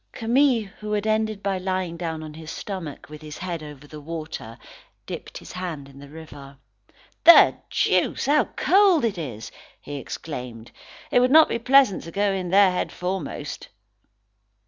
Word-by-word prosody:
Camille, 240 +1 +2 0.2
who 210 0 -4
had 210 0 -1
ended 215 -1 0
by 195 -1 -1
lying 185 -2 -2
down 165 -2 -4
on 155 -1 -9
his 160 0 -10
stomach, 180 -7 -7
with 150 0 -11
his 150 -1 -9
head 175 -3 -5
over 150 -2 -11
the 150 +1 -11
water, 155 -7 -7 0.5
dipped - - -8
his - - -11
hands 170 -6 -6
in 140 0 -15
the 140 0 -12
river. 145 -3 -12 0.7
"The 340 - +8
deuce! - - +1
How 295 +2 +3
cold 380 -7 +3
it 205 -5 -2
is!" 115 -8 -7 0.3
he 145 0 -7
exclaimed. 125 -5 -7 0.4
"It - - +5
would 250 +1 +3
not 315 +3 +7
be 235 - -1
pleasant 260 -3 +4
to 165 - -8
go 200 +2 +1
in 185 -2 -3
there 195 +1 +5
head 180 - -2
foremost." 185 +2 -5
180 Hz, 170 wpm, -24 LUFS, 150-215 Hz, 0.7 s, The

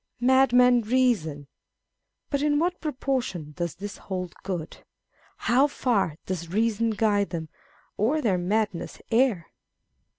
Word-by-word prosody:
" - - -45
Madmen 250 -2 +5
reason." 215 - +1 0.9
But 280 -1 0
in 295 0 +2
what 350 +3 0
proportion 255 - -2
does 170 -1 -4
this 205 +2 -7
hold 180 -2 -5
good? 180 -5 -5 0.6
How 265 +4 +3
far 225 - 0
does 170 -3 -4
reason 225 +2 +1
guide 205 -2 +1
them, 160 -3 -5 0.5
or 250 +10 +2
their 200 -10 +1
madness 205 0 -1
err 230 -8 +2
215 Hz, 125 wpm, -26 LUFS, 180-255 Hz, 0.9 s, Madmen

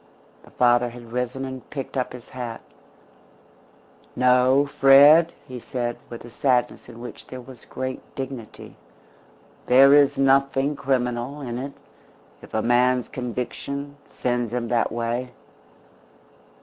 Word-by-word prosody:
The - - -18
father 120 0 +3
had 120 -1 -12
risen 125 +2 -3
and 130 -1 -8
picked 135 -2 -6
up 130 -1 -1
his 125 -2 -11
hat. 120 -3 -6 1.5
"No, 125 +2 +4
Fred," 145 +4 +6 0.2
he 125 -1 -7
said, 120 0 -3
with 120 0 -9
a - - -11
sadness 125 0 0
in 115 -1 -12
which 120 -1 -10
there 130 - -8
was 125 -1 -12
great 130 0 -5
dignity, 130 -4 -8 0.9
"there 135 +2 +7
is 145 -2 +5
nothing 135 +1 +2
criminal 125 0 -2
in 120 -3 -5
it 140 +2 -6 0.7
if - - -14
a 110 - 0
man's 125 +1 +2
conviction 135 +3 -5
sends 120 -2 -2
him 120 -2 -3
that 120 -1 +1
way. 120 +2 -3
125 Hz, 130 wpm, -23 LUFS, 120-135 Hz, 1.5 s, there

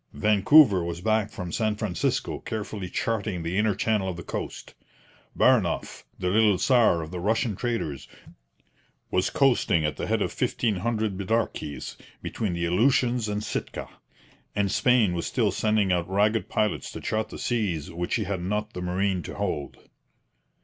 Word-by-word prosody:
Vancouver 105 - +5
was 85 0 -4
back 110 +2 +1
from 90 -5 -6
San 110 +1 0
Francisco 105 -5 -1
carefully 105 -3 -5
charting 105 -6 -2
the 85 +2 -3
inner 105 0 +2
channel 105 -2 0
of 90 - -5
the 85 - -7
coast. - - -6 0.6
Baranoff, - - +2
the 90 -1 -1
little 105 -2 +4
czar 110 -7 +3
of 80 - -9
the 90 - -4
Russian 110 +3 0
traders, 115 - -3 1.0
was 90 0 +1
coasting 130 - +2
at 75 - -2
the - - -3
head - - +1
of - - -3
fifteen 110 -5 0
hundred 110 -1 -1
'bidarkies' 100 -8 -2 0.3
between 105 -6 -2
the 85 0 -1
Aleutians 120 +5 +2
and 105 0 -2
Sitka; - - -4 0.7
and 100 -1 +1
Spain 120 -5 +3
was 85 -1 -2
still 110 -5 +1
sending 105 0 +1
out 90 -1 0
ragged 105 +1 +1
pilots 105 -1 -1
to - - -6
chart 110 0 -2
the - - -8
seas 95 - -1
which 85 +1 -3
she 110 - +1
had 95 -2 -3
not 105 +4 -2
the 90 - -5
marine 90 +1 0
to - - -8
hold. 90 -8 -3
100 Hz, 165 wpm, -26 LUFS, 90-110 Hz, 1.0 s, Vancouver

